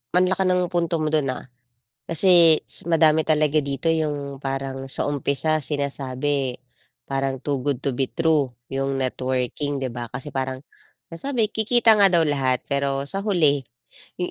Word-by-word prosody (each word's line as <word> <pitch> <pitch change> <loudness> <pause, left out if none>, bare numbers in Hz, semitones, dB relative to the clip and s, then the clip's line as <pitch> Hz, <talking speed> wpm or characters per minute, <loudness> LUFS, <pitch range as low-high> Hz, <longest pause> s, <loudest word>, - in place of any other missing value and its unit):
ang 180 +1 +5
laki 190 - +1
ng 180 -1 +1
punto 170 -1 0
mo 155 -1 -1
dun, 155 -3 +2
ah, 130 - -7 0.6
kasi 165 -2 +5 0.2
madami 160 -2 +3
talaga 155 -1 +2
dito 140 +2 -1
yung 145 -3 -2
parang 135 -1 -4
sa 135 - -3
umpisa, 145 +2 0
sinasabi 140 -2 -2 0.6
parang 135 -1 -2
too 140 -2 -1
good 130 0 -2
to 140 - +1
be 130 +1 -1
true 160 -2 +1 0.2
yung 135 0 -1
networking 130 +2 -2
di 130 - -2
ba, 120 0 -6
kasi 135 +3 -5
parang 130 -1 -3 0.5
nasabi 225 +5 -1
kikita 220 0 +4
nga 200 - +7
daw 175 -3 +4
lahat 135 -4 0
pero 140 0 0
sa 145 +8 -4
huli, 160 - +2 0.5
yung 180 - -3
145 Hz, 155 wpm, -23 LUFS, 135-165 Hz, 0.6 s, nga